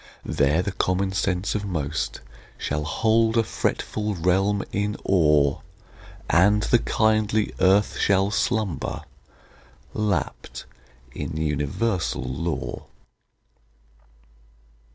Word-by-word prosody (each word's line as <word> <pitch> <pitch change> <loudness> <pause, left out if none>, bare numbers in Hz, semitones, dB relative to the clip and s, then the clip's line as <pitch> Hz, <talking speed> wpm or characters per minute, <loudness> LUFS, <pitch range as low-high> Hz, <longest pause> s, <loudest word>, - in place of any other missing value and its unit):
There 75 +5 +2
the 100 - -2
common 95 +1 0
sense 95 -1 -1
of 105 - -2
most 70 -9 -3 0.4
shall 75 +1 -2
hold 110 +7 +2
a 115 - +4
fretful 105 0 -2
realm 95 +4 +1
in 105 +1 -1
awe, 75 -6 +3 0.7
And 105 +5 +4
the 120 - +3
kindly 110 -1 +1
earth 95 +2 +3
shall 100 0 +2
slumber, 105 - -1 0.9
lapt 100 -9 -2 0.5
in - - -5
universal 80 - -1
law. 75 +7 -4
95 Hz, 90 wpm, -24 LUFS, 80-105 Hz, 0.9 s, a